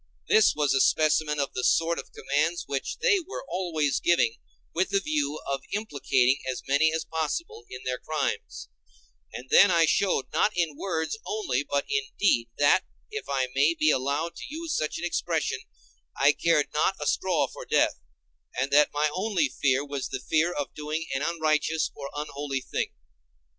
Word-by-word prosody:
This 440 0 +5
was 150 -2 +2
a 135 - +3
specimen 155 -1 +2
of 140 - -1
the 125 - -3
sort 165 +4 +2
of - - -9
commands 155 +5 -1
which 135 -1 -3
they 415 -5 +4
were 365 -4 -7
always 165 -6 0
giving 120 -10 +2 0.4
with 185 +3 0
the 200 - +2
view 150 -4 -1
of 135 -1 -2
implicating 140 - +1
as 130 - -6
many 145 +3 +3
as 160 0 -2
possible 160 - -3
in 130 0 -8
their 125 -1 -2
crimes; 155 - -3 0.6
and 130 +1 -9
then 200 - +8
I 170 -2 +4
showed, 180 -3 +1
not 210 - +2
in 165 -4 0
words 165 +3 -3
only, 140 -12 -1
but 140 -1 -1
in 425 +1 +1 0.2
deed, 120 - +2
that, 145 +6 +4 0.3
if 435 - -6
I 130 -2 0
may 145 +5 +3
be 155 -1 +3
allowed 145 +6 -1
to - - -7
use 320 +2 -4
such 155 - -1
an 175 - -4
expression, 165 -5 -1 0.6
I 140 +2 +5
cared 150 -1 +1
not 155 +5 +2
a 150 - -4
straw 180 +1 +1
for - - -9
death, - - +1 0.6
and 135 +2 0
that 150 +1 +5
my 150 +1 +1
only 220 +8 0
fear 135 0 +1
was 140 -2 -4
the 130 - -4
fear 160 +6 +1
of 145 -4 -4
doing 155 +2 -4
an 135 - -1
unrighteous 155 -1 0
or 140 -1 -7
unholy 145 -2 -4
thing. - - -3
155 Hz, 180 wpm, -27 LUFS, 140-170 Hz, 0.6 s, then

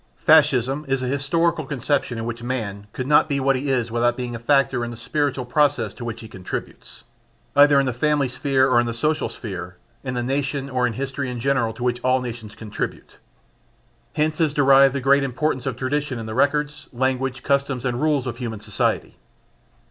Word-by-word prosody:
Fascism 130 +4 +4
is 135 -1 0
an 125 - -1
historical 165 +4 +1
conception 135 -2 -1
in 115 - -4
which 115 0 -5
man 110 -5 -4
could 130 - -4
not 150 +2 +4
be 140 -1 0
what 135 0 +2
he 135 +2 -2
is 120 -3 0
without 120 +1 +1
being 125 -2 -4
a - - -6
factor 135 0 +2
in 120 - -3
the 120 - -8
spiritual 135 +2 -1
process 145 +3 +1
to 125 - -9
which 115 -1 -5
he 110 - -9
contributes, 95 -4 -8 0.5
either 145 0 +7
in 135 - +2
the 130 - -1
family 145 +2 +1
sphere 130 +1 +1
or 125 -3 +4
in 120 - +1
the 115 - -3
social 150 +6 0
sphere, 90 -5 -7 0.3
in 125 -2 -4
the 120 - -1
nation 140 +1 -2
or 125 -1 +1
in 115 - -3
history 135 0 -3
in 125 -1 -5
general 130 -3 +1
to 115 +2 -8
which 125 0 -1
all 130 0 +3
nations 115 -4 -7
contribute. 110 -2 -6 1.0
Hence 155 +1 0
is 155 -2 +1
derived 135 -1 +5
the 140 - -1
great 140 +2 +4
importance 135 0 -1
of 125 -3 -3
tradition 140 +1 -2
in 115 - -6
the 110 - -5
records, 145 +2 0
language, 130 +1 -1
customs 140 -2 0
and 125 -1 -1
rules 150 -4 +1
of 120 -2 -4
human 115 -4 -5
society. 105 -1 -2
130 Hz, 200 wpm, -22 LUFS, 120-140 Hz, 1.0 s, either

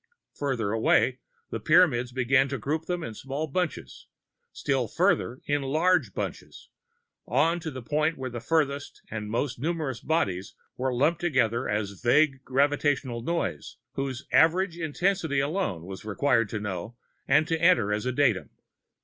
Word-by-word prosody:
Farther 125 -8 -2
away, 120 +3 +2 0.3
the 115 - -3
Pyramids 130 - +4
began 130 +2 +3
to 135 - -2
group 155 +7 -2
them 175 -1 -2
in 115 - -5
small 135 +6 -4
bunches, 170 +3 -4 0.4
still - - -1
farther 125 +3 +1
in 145 0 0
large 160 +7 +1
bunches, - - -6 0.6
on 170 +2 +2
to 165 -1 -5
the 130 -4 -8
point 155 +5 0
where 130 -1 -5
the 120 -1 -5
farthest 145 0 -1
and 105 -1 -4
the - - -6
most 120 +1 -1
numerous 155 -4 -2
bodies 95 - -1 0.2
were 130 +1 -1
lumped 150 +8 +1
together 125 -8 +1
as 105 -1 -1
a 100 - -15
vague 135 -1 +3
gravitational 135 -2 +1
"noise" 145 - -3 0.2
whose 135 -1 -4
average 170 +2 +4
intensity 165 -1 0
alone 140 - -1
it - - -11
was 95 -1 -8
required 115 +1 +1
to 105 - -3
know 100 +2 -5 0.3
and 150 +4 +4
to 165 -2 -1
enter 170 - +4
as 105 +4 -2
a - - +1
datum. 125 -7 +1
135 Hz, 160 wpm, -27 LUFS, 120-160 Hz, 0.6 s, Pyramids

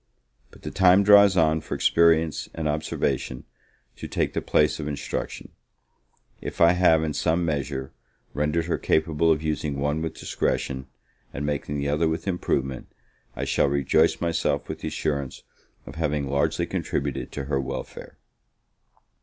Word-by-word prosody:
But - - -19
the - - -5
time 95 +1 +5
draws 100 -1 +7
on 80 -1 +3
for - - -5
experience 80 -2 +2
and 80 -2 -2
observation 75 -4 -2 0.5
to - - -7
take - - -1
the - - -1
place 75 +1 +2
of 75 - -4
instruction: 75 -1 -5 0.9
if - - -7
I 85 0 +7
have 90 -3 +4
in 80 -1 -2
some 85 +3 +1
measure, 70 -3 -3 0.4
rendered 75 +3 0
her 85 - -1
capable 80 +1 +2
of 80 -1 0
using 75 -2 -2
one 75 +2 -1
with 80 -1 -4
discretion, 65 -1 -2 0.4
and 70 - -4
making 75 0 -2
the 70 0 -1
other 75 +3 +1
with 80 +3 -4
improvement, 70 -8 -2 0.5
I - - -3
shall - - +2
rejoice 70 +3 +2
myself 80 -4 -1
with - - -6
the - - -5
assurance 70 -3 -3 0.4
of 70 - -9
having 75 -2 -1
largely 70 +1 0
contributed 70 -1 -3
to 70 - -4
her 70 0 -1
welfare. 65 - -7
75 Hz, 155 wpm, -25 LUFS, 70-80 Hz, 0.9 s, draws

